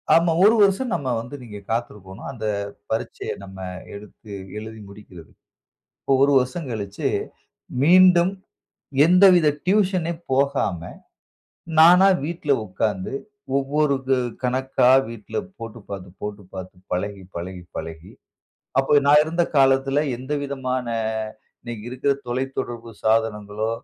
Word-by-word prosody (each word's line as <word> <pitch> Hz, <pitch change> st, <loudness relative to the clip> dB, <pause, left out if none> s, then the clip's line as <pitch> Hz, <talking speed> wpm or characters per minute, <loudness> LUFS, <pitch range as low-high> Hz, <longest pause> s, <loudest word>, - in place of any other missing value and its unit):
ஆமா. 165 Hz, 0 st, +4 dB
ஒரு 215 Hz, +3 st, +7 dB
வருஷம் 205 Hz, +5 st, +3 dB
நம்ம 135 Hz, -2 st, -3 dB
வந்து 125 Hz, +5 st, -9 dB
நீங்க 105 Hz, -4 st, -9 dB
காத்திருக்கணும். 105 Hz, -5 st, -5 dB
அந்த 115 Hz, -4 st, -7 dB, 0.5 s
பரீட்சய 110 Hz, -, -3 dB
நம்ம 95 Hz, -1 st, -11 dB, 0.4 s
எடுத்து 105 Hz, +1 st, -12 dB, 0.3 s
எழுதி 110 Hz, +1 st, -8 dB
முடிக்கிறது. 95 Hz, -5 st, -13 dB, 0.7 s
இப்போ 135 Hz, -, +1 dB
ஒரு 140 Hz, +1 st, +4 dB
வருஷம் 130 Hz, +4 st, -3 dB
கழிச்சு 100 Hz, -3 st, -3 dB, 0.7 s
மீண்டும் 180 Hz, +2 st, +6 dB, 0.7 s
எந்தவித 180 Hz, -1 st, +6 dB, 0.2 s
டியூஷன் 185 Hz, -3 st, +2 dB, 0.2 s
போகாம 135 Hz, -, +1 dB, 1.0 s
நானா 180 Hz, +4 st, +8 dB, 0.2 s
வீட்ல 160 Hz, -2 st, -2 dB
உக்கார்ந்து 95 Hz, +2 st, -2 dB, 0.4 s
ஒவ்வொரு 140 Hz, +1 st, +1 dB
க -, -, 0 dB, 0.3 s
கணக்கா 130 Hz, 0 st, +2 dB, 0.2 s
வீட்ல 115 Hz, -2 st, -7 dB, 0.2 s
போட்டு 115 Hz, 0 st, -8 dB
பார்த்து, 95 Hz, -2 st, -7 dB
போட்டு 105 Hz, -1 st, -6 dB
பார்த்து 95 Hz, 0 st, -8 dB, 0.2 s
பழகி, 100 Hz, +1 st, -3 dB
பழகி, 90 Hz, +1 st, -6 dB
பழகி 80 Hz, +2 st, -7 dB, 0.7 s
அப்போ 135 Hz, -, +2 dB
நான் 150 Hz, +1 st, +7 dB
இருந்த 170 Hz, +2 st, 0 dB
காலத்தில 135 Hz, +1 st, +4 dB, 0.2 s
எந்தவிதமான 130 Hz, -1 st, -3 dB, 0.7 s
இன்னக்கி 115 Hz, -3 st, -7 dB
இருக்கிற 130 Hz, +2 st, +1 dB
தொலைத்தொடர்பு 120 Hz, -2 st, -4 dB
சாதனங்களோ! 110 Hz, -1 st, 0 dB
125 Hz, 110 wpm, -23 LUFS, 105-150 Hz, 1.0 s, நானா